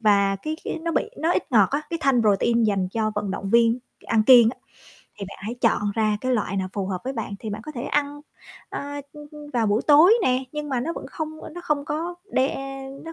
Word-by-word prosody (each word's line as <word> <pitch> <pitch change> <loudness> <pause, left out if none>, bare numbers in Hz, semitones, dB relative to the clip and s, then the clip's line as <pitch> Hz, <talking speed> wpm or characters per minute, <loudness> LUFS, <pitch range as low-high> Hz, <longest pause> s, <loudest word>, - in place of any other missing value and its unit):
và 200 -2 +3
cái 310 +10 -4
cái - - -3
nó 335 0 -1
bị - - +2 0.2
nó 325 - +1
ít 355 - -2
ngọt 210 -5 +6
á, 285 +2 -1
cái 335 - -2
thanh 270 -3 +3
protein 225 +3 +3
dành 195 -3 +1
cho 215 +1 0
vận 200 - -2
động 195 +1 -4
viên 235 +1 +4 0.2
c - - -24
ăn 220 -1 +2
kiêng 240 -2 +8
á, - - -11 0.6
thì 200 - -4
bạn - - -10
hãy 215 +5 -5
chọn 230 -3 +2
ra 215 -2 +1
cái 255 0 0
loại 205 -4 -1
nào 190 -1 -1
phù 195 -2 -3
hợp 185 -2 -3
với 265 - -2
bạn. 225 -5 -4
Thì 220 - -6
bạn 210 +1 -5
có 305 - -8
thể 240 -4 -5
ăn, 290 +1 -1 0.5
ơ, - - -5 0.3
ưm, 295 -1 -11
ưm, 300 -1 -11
vào 235 -3 +1
buổi 210 +3 +1
tối 315 +8 +7
nè, 255 -2 +1
nhưng 300 -1 -4
mà 260 -3 -1
nó 325 +7 -2
vẫn - - -7
không, 315 -1 -6
ơ, - - -8
nó 350 - -6
không 285 -1 0
có 325 +3 -3 0.2
đe 265 +1 +1 0.5
nó 330 - -7
245 Hz, 255 wpm, -24 LUFS, 210-295 Hz, 0.6 s, kiêng